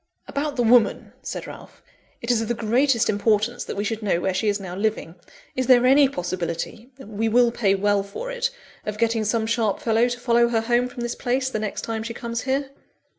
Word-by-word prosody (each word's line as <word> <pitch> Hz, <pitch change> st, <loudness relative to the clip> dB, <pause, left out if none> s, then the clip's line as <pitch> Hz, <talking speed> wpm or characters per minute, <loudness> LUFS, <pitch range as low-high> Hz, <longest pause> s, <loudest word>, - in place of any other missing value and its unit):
"About 285 Hz, 0 st, -3 dB
the 245 Hz, -, +1 dB
woman," 230 Hz, -2 st, +3 dB
said -, -, -5 dB
Ralph; -, -, -12 dB, 0.4 s
"it 235 Hz, -, +1 dB
is 230 Hz, -2 st, +2 dB
of 225 Hz, -, -3 dB
the 240 Hz, -, -1 dB
greatest 235 Hz, +2 st, +2 dB
importance 215 Hz, +3 st, +1 dB
that -, -, -5 dB
we 205 Hz, -, -1 dB
should 220 Hz, +1 st, -3 dB
know 195 Hz, -5 st, +1 dB
where 190 Hz, +1 st, -1 dB
she 195 Hz, +4 st, -1 dB
is 205 Hz, 0 st, +1 dB
now 185 Hz, -2 st, -7 dB
living. 205 Hz, -4 st, -2 dB, 0.4 s
Is 255 Hz, -1 st, -1 dB
there 250 Hz, -1 st, +6 dB
any 275 Hz, +1 st, +6 dB
possibility 180 Hz, +2 st, -4 dB
(we 220 Hz, -3 st, -3 dB
will 240 Hz, +1 st, +4 dB
pay 205 Hz, -5 st, +1 dB
well 205 Hz, +1 st, +2 dB
for 200 Hz, -, -6 dB
it) -, -, -1 dB, 0.3 s
of 210 Hz, 0 st, -4 dB
getting 230 Hz, 0 st, +1 dB
some 220 Hz, +1 st, 0 dB
sharp 220 Hz, -3 st, 0 dB
fellow 230 Hz, +1 st, +2 dB
to 245 Hz, 0 st, -4 dB
follow 235 Hz, -1 st, +3 dB
her 230 Hz, -1 st, +1 dB
home 240 Hz, +2 st, +1 dB
from 245 Hz, -, -8 dB
this 240 Hz, 0 st, -2 dB
place, 260 Hz, +1 st, -1 dB
the 215 Hz, -, -2 dB
next 210 Hz, -2 st, -3 dB
time 225 Hz, -1 st, -3 dB
she 230 Hz, +1 st, -6 dB
comes 235 Hz, -1 st, -4 dB
here?" 270 Hz, +1 st, -1 dB
230 Hz, 220 wpm, -23 LUFS, 210-245 Hz, 0.4 s, there